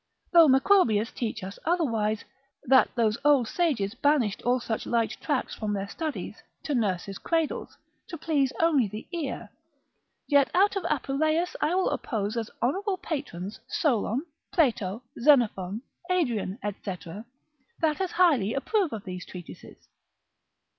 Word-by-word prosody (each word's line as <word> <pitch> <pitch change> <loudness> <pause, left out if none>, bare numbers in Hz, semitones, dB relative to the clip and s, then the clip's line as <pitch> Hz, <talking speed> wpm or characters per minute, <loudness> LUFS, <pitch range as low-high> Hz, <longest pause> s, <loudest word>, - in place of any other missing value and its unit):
Though 335 -2 +8
Macrobius 265 - +4
teach 220 -4 -4
us 195 +2 -7
otherwise, 230 - 0 0.4
that 260 +1 +5
those 225 -2 +1
old 285 -5 +4
sages 255 - 0
banished 270 -8 +1
all 250 +1 +2
such 225 -2 -4
light 230 -1 +1
tracts - - -1
from 215 -1 -3
their 200 0 -2
studies, 310 +8 -5 0.2
to 295 - -2
nurse's 195 -5 -1
cradles, 325 -2 -2 0.3
to 335 - -7
please 290 -4 +1
only 305 -8 +3
the 210 +2 -8
ear; 270 - -4 0.8
yet 285 -2 +4
out 395 +2 +4
of 390 - -2
Apuleius 310 +4 0
I 315 +4 +2
will 375 - +2
oppose 215 -3 -2
as 225 -2 -3
honourable 380 - 0
patrons, 270 - -5
Solon, 255 0 0 0.3
Plato, 230 - +1 0.2
Xenophon, 230 -6 +3 0.3
Adrian, 240 - 0
&c. 205 -2 -4 0.9
that 310 +1 +1
as 375 - -2
highly 285 - +3
approve 355 - 0
of 215 -3 -5
these 180 -1 -6
treatises. 180 -2 -11
255 Hz, 135 wpm, -27 LUFS, 210-320 Hz, 0.9 s, Though